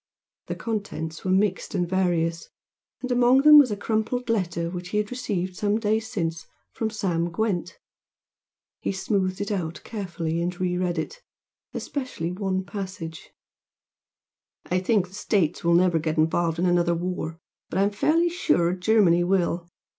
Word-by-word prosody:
The - - -3
contents 200 -8 -4
were 185 - -2
mixed 195 +2 +1
and 175 -2 +1
various, 170 -2 0 0.5
and 255 - -2
among 245 +2 +5
them 300 0 +10
was 275 -4 +5
a 205 - -2
crumpled 225 +4 -1
letter 170 -6 -1
which 180 0 -6
he 210 - -1
had 210 +1 -1
received 195 -8 -3
some 205 +3 0
days 220 0 0
since 165 -7 -3 0.2
from 225 - -2
Sam 175 -6 -1
Gwent. 195 -1 -2 1.0
He - - -2
smoothed 190 -1 -1
it 205 - -2
out 170 -4 -3
carefully 170 -6 -3
and 175 +2 -3
re 180 -1 0
read 180 -1 -1
it, 485 - -4 0.5
especially 255 - -4
one 190 0 -1
passage 185 -6 -7 1.4
"I 180 - 0
think 190 0 +1
the - - -19
States 195 -5 0
will 170 0 +4
never 175 -2 +4
get 155 0 -2
involved 165 +1 +2
in 175 - +1
another 175 -1 +3
war, 170 -2 -3 0.3
but - - -3
I 195 - +4
am 200 - +2
fairly 320 +11 +2
sure 175 - +1
Germany 185 -2 +3
will. 175 -2 0
185 Hz, 160 wpm, -25 LUFS, 170-215 Hz, 1.4 s, them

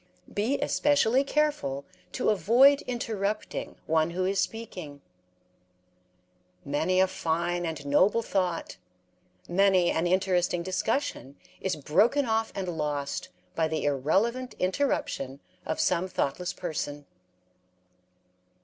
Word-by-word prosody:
Be 230 +7 0
especially 275 -3 +3
careful 275 - 0 0.3
to - - +1
avoid 245 - +5
interrupting 215 -4 -3
one 160 0 +2
who 185 +2 -1
is 195 +1 0
speaking. 180 -11 -4 1.6
Many 160 +6 +1
a 190 - +6
fine 175 0 -1
and 160 -3 -5
noble 190 +11 +3
thought, 180 -5 -2 0.7
many 190 -1 +3
an 165 +2 0
interesting 180 -1 +1
discussion, 185 - -2 0.2
is 190 - -1
broken 210 - +2
off 225 -1 0
and 190 -2 -3
lost 150 -4 -3 0.2
by 160 - +1
the 160 0 -2
irrelevant 195 - 0
interruption 185 - -1 0.3
of 160 - -2
some 175 +2 +1
thoughtless 180 0 -2
person. 145 -4 -5
185 Hz, 105 wpm, -28 LUFS, 160-220 Hz, 1.6 s, a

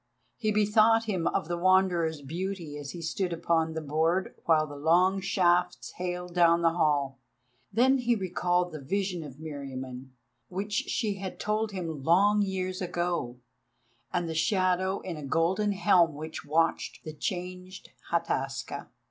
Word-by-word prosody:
He 215 -3 -1
bethought 215 +2 +4
him 185 -7 -1
of - - -1
the 175 0 -2
Wanderer's 175 -4 +2
beauty 170 +1 -4
as 145 -1 -7
he 170 +2 -7
stood 180 +3 -1
upon 165 -1 0
the 160 - -3
board 160 +5 0
while 155 -2 +4
the 145 -1 -9
long 175 +6 +3
shafts 180 -2 +1
hailed 180 0 -5
down 170 -1 +4
the 165 - +5
hall. 145 -5 +1 0.5
Then 260 +6 +4
he 240 -1 +2
recalled 180 -2 0
the 155 - -7
vision 185 +3 -2
of 140 -4 -9
Meriamun, 135 -4 -7 0.4
which 200 +3 -4 0.2
she 210 -4 -1
had 190 -1 -6
told 215 +1 -1
him 165 -6 -4
long 200 +8 +4
years 185 -1 -2
ago, 175 -8 -2 0.7
and 175 -1 -1
the 165 - -3
shadow 185 +2 +1
in 175 -4 -5
a 150 - -7
golden 170 +8 +1
helm 180 -5 +4
which 155 +2 -6
watched 165 +3 0
the 155 - -7
changed 180 +2 -5 0.2
Hataska. 135 -5 -2
175 Hz, 150 wpm, -28 LUFS, 160-190 Hz, 0.7 s, the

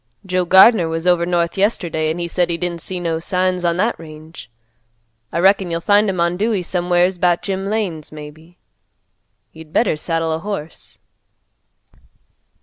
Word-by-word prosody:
Joe 185 -1 0
Gardner 190 0 +6
was 165 +1 -3
over 175 -1 +2
north 175 +1 0
yesterday, 170 -6 0
an' 160 - -2
he 170 0 -3
said 175 0 0
he 170 - -1
didn't 170 -1 -4
see 185 -1 -4
no 165 -2 -2
signs 185 +1 -1
on 170 0 +1
that 220 +6 0
range. 155 -2 -12 0.8
I - - -3
reckon 190 +1 +3
you'll 165 0 -2
find 205 +3 +3
'em 185 -2 -3
on 170 +1 +1
Dewey 210 -2 0
somewheres 180 +1 +1
about 175 -1 +1
Jim 195 -1 -3
Lane's, 195 -8 -3
maybe. 155 +3 -12 0.9
You'd 160 -1 -14
better 210 -1 +2
saddle 165 +1 -2
a 160 - -2
horse." 175 -4 -7
175 Hz, 160 wpm, -19 LUFS, 165-190 Hz, 0.9 s, Gardner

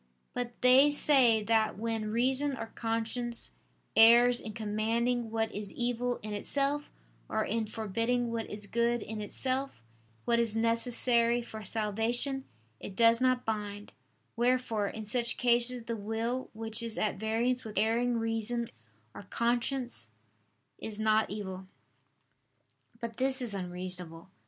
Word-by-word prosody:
But 245 -1 -5
they 260 +3 +7
say 260 -7 +4
that 220 -1 +1
when 225 -1 -2
reason 260 +5 +1
or 225 0 -6
conscience 230 +1 -3 0.4
errs 240 +2 +7
in 215 - -7
commanding 230 +2 -1
what 225 0 -1
is 205 -1 -5
evil 245 0 -1
in 215 0 -5
itself, 280 +7 -1 0.4
or 220 0 0
in 225 0 -1
forbidding 230 +3 -1
what 230 -1 -3
is 210 0 -6
good 235 +2 0
in 220 0 -6
itself 260 - -2 0.4
and 235 -2 +2
necessary 235 +1 +2
for 220 -2 -9
salvation, 225 +6 0 0.3
it 195 - -8
does 230 +2 +4
not 255 -1 +2
bind; 205 -2 -4 0.4
wherefore 240 -3 +1
in 220 +1 -6
such 235 +2 0
cases 240 0 +2
the 230 0 -3
will 225 +4 -3
which 225 0 -3
is 230 -1 -3
at 210 -3 -1
variance 235 +4 0
with 215 -2 -9
erring 230 +3 +2
reason 225 +1 0 0.4
or - - -9
conscience 240 - -1 0.7
is 215 -1 -5
not 220 0 +2
evil. 190 -2 -6 1.3
But 230 -1 -6
this 265 +1 +2
is 240 -5 -1
unreasonable. 180 -2 -4
230 Hz, 130 wpm, -30 LUFS, 215-245 Hz, 1.3 s, they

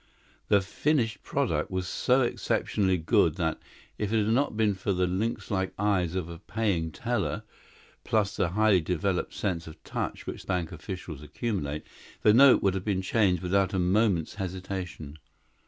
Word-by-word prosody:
The 100 -1 +4
finished 115 +3 0
product - - -1
was 95 -1 -2
so 125 +7 +2
exceptionally 100 -5 +1
good 80 - +3
that, - - -1 0.4
if 105 -1 -1
it 115 - +2
had 110 - +2
not 130 -3 +1
been 110 -2 +3
for 95 +1 -2
the 90 0 +1
lynxlike 100 0 -1
eyes 95 -4 +1
of 90 -3 -2
a 85 -1 -8
paying 95 -8 -1
teller - - -2 0.6
plus 100 -2 +1
the 85 - +1
highly 105 0 +3
developed 90 +3 -1
sense 85 -5 -2
of 80 - -12
touch - - -4
which - - -7
bank 90 -3 -1
officials 85 -2 -7
accumulate 75 - -3 0.4
the 105 - +6
note 135 +3 +7
would 95 - +3
have 95 -1 -3
been 95 -3 -1
changed 95 -4 +2
without 95 +2 +1
a - - +2
moment's 90 -2 +2
hesitation. 90 -5 -5
95 Hz, 160 wpm, -28 LUFS, 90-105 Hz, 0.6 s, note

